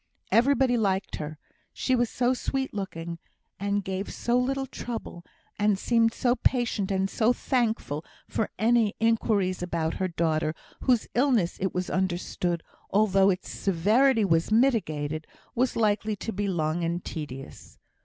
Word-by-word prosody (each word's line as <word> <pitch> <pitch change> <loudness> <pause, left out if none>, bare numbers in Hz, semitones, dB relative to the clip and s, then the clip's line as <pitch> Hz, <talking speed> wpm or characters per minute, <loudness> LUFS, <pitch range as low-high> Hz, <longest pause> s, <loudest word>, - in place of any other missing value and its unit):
Everybody 260 0 +4
liked 195 -3 0
her, 155 0 -6 0.4
she 260 - +1
was 240 -2 +1
so 250 +1 +1
sweet 265 +1 -2
looking, 170 -4 -5 0.4
and 200 +1 0
gave 190 +1 -4
so 240 - -1
little 270 +2 +1
trouble, 230 -9 -6 0.4
and 210 -1 +3
seemed 230 +2 +3
so 245 +1 +1
patient, 230 -6 +1
and 190 -1 +1
so 220 +4 +2
thankful 225 - -1 0.2
for 220 - -1
any 225 -1 +3
inquiries 215 -5 +1
about 170 -2 -1
her 185 - +2
daughter, 160 -2 0 0.2
whose 245 -4 +2
illness, 240 -9 +2
it 190 -1 -1
was 180 0 -2
understood, 175 -2 -1 0.3
although 195 -1 +4
its 185 -1 -1
severity 215 +6 +3
was 165 +1 +2
mitigated, 155 - +1 0.3
was 250 +2 +1
likely 215 -1 +1
to 225 +3 -5
be 205 +1 -1
long 170 -2 0
and 170 +1 -2
tedious. 135 -4 -8
200 Hz, 145 wpm, -27 LUFS, 175-235 Hz, 0.4 s, Everybody